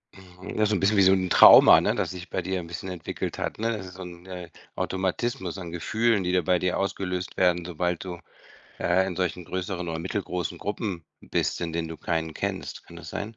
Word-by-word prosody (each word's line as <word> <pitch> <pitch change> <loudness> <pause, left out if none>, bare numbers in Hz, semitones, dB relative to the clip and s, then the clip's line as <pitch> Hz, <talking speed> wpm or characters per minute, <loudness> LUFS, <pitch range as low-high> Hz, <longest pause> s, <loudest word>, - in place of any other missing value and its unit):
Hm, 95 0 -10
ja, 110 - +3
so 105 - +1
'n 95 - 0
bisschen 100 +2 +2
wie - - +6
so 95 0 +6
'n 95 -1 0
Trauma, - - +9
ne, - - +1
das - - -1
sich 90 -1 -8
bei 95 - -2
dir 95 0 -2
'n 85 - -7
bisschen 85 +2 -6
entwickelt 90 -3 -5
hat, - - -3
ne? 115 +2 0
Das 100 -3 -6
ist 90 - -11
so 95 - -8
'n, 90 0 -11
äh, 90 -2 -7 0.3
Automatismus 95 +1 -2
an 85 -3 -7
Gefühlen, 110 +4 +1
die 90 - 0
da 90 -1 +3
bei 90 +2 +2
dir 90 -1 0
ausgelöst 90 -2 -3
werden, 90 -2 +2
sobald 90 0 -2
du, 90 -2 -7 0.6
äh, 95 +2 +2
in 90 -2 -4
solchen 90 -1 -2
größeren 90 0 -4
oder 80 0 -3
mittelgroßen 90 -2 -3
Gruppen 100 -5 -4 0.2
bist, - - -1
in 85 -1 -3
denen 85 0 -2
du 80 - -7
keinen 80 -2 -2
kennst. - - -4
Kann - - -12
das - - -9
sein? 110 +2 -5
90 Hz, 230 wpm, -26 LUFS, 85-95 Hz, 0.6 s, Trauma